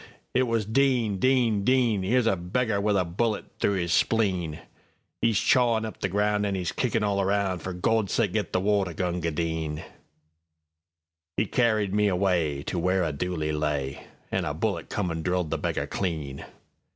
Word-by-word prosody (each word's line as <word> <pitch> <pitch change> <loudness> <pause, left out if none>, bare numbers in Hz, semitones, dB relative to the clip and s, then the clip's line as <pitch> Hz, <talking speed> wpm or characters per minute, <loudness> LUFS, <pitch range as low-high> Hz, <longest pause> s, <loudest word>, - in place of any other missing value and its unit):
It 130 0 +2
was 115 -2 0
"Din! 120 -3 +2
Din! 120 -5 +2
Din!'Ere's 120 -2 +2
a 115 - +3
beggar 100 +4 -1
with 105 0 +2
a 90 - +2
bullet 105 +6 -1
through 100 - +2
'is 85 -2 0
spleen;'E's 95 +2 -1
chawin' 120 -3 +3
up 110 - -7
the 95 - -1
ground 105 +2 +1
an' 100 -1 0
'e's 90 -2 -2
kickin' 115 -3 0
all 100 -1 +1
around:For 95 -2 0
Gawd's 100 +3 0
sake, - - +1
git - - -1
the - - +1
water, 100 -2 +1
Gunga 90 -1 -1
Din!"'E 80 0 -7
carried 110 -5 +1
me 105 0 +3
awayTo 90 -5 0
where 90 +1 +2
a 80 - 0
dooli 80 0 -2
lay, 75 -3 -2 0.2
An' - - 0
a - - -2
bullet - - -2
come 90 -4 -1
an' 80 0 -3
drilled 90 -2 -1
the 80 - -1
beggar - - -1
clean. 75 -7 -3
95 Hz, 160 wpm, -26 LUFS, 80-105 Hz, 0.2 s, a